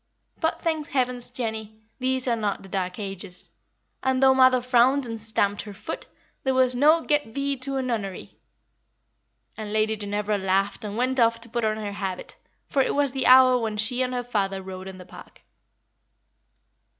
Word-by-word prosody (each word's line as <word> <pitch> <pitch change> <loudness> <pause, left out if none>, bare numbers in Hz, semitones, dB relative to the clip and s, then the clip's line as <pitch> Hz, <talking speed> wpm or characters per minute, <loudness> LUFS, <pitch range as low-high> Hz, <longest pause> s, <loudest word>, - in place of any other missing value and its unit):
But, 320 -1 -1
thank 315 -3 -1
heavens, 250 -2 -1
Jenny, 220 -2 -5 0.2
these 260 0 0
are 240 - +2
not 210 -3 -2
the 195 - -12
Dark 185 -1 -2
Ages, 195 -3 -7 0.5
and 260 0 +1
though 265 0 +7
mother 255 -1 +5
frowned 250 +2 +3
and 225 -2 -6
stamped 205 -2 +1
her 205 -2 -10
foot, - - -6 0.4
there 265 -1 +1
was 255 -1 +3
no 305 +6 +5
'Get 295 -8 0
thee 280 0 0
to 270 +2 -2
a 265 - -1
nunnery!'" 215 -7 -4 1.2
And 215 -1 -5
Lady 215 0 +1
Ginevra 205 0 -2
laughed 195 +2 0
and 210 0 -5
went 255 +2 0
off 230 0 +3
to 230 - -10
put 235 +1 -2
on 215 0 +1
her 210 -2 -4
habit, 195 -2 -5 0.3
for 275 - +2
it - - 0
was 285 -2 +2
the 265 0 0
hour 255 0 +7
when 220 -2 -3
she 230 +4 +1
and 255 0 0
her 245 - -2
father 195 -5 -2
rode 185 0 -8
in 190 -1 -8
the 180 - -11
park. 180 - -14
230 Hz, 185 wpm, -25 LUFS, 205-260 Hz, 1.2 s, though